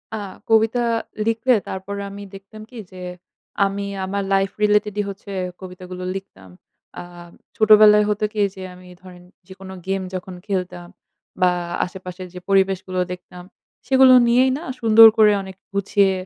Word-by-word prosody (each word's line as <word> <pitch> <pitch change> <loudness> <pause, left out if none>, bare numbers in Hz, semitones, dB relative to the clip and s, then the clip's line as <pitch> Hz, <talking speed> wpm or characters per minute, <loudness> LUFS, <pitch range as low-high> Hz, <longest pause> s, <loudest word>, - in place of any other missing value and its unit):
আ - - -4 0.3
কবিতা 225 +2 +3 0.5
লিখলে 230 +3 +2
তারপরে 200 +2 -6
আমি 200 +1 -10
দেখতাম 195 +2 -12
কি 245 - -11
যে 185 - -13 0.7
আমি 200 +1 -3 0.2
আমার 200 +1 -3
লাইফ 195 0 +2
রিলেটেড 210 0 +2
ই - - +1
হচ্ছে 200 +1 -10 0.3
কবিতাগুলো 180 0 -9
লিখতাম। 95 - -10 0.5
আ - - -5 0.6
ছোটবেলায় 210 -1 +6
হতো 210 +1 -2
কি 210 - -1
যে 190 - -10
আমি 180 0 -15
ধরেন 180 -1 -14 0.2
যেকোনো 190 0 -11
গেম 195 0 -1
যখন 185 0 -6
খেলতাম 180 -3 -4 0.5
বা 180 -1 +4 0.3
আশেপাশের 185 0 -9
যে 180 - -8
পরিবেশগুলো 190 -1 +1
দেখতাম 180 0 -10 0.4
সেগুলো 265 -1 +6
নিয়েই 255 +2 +3
না 310 - -9 0.2
সুন্দর 225 0 +8
করে 215 -1 +6
অনেক 190 -1 -10 0.2
গুছিয়ে 200 0 +2
195 Hz, 145 wpm, -21 LUFS, 185-215 Hz, 0.7 s, সুন্দর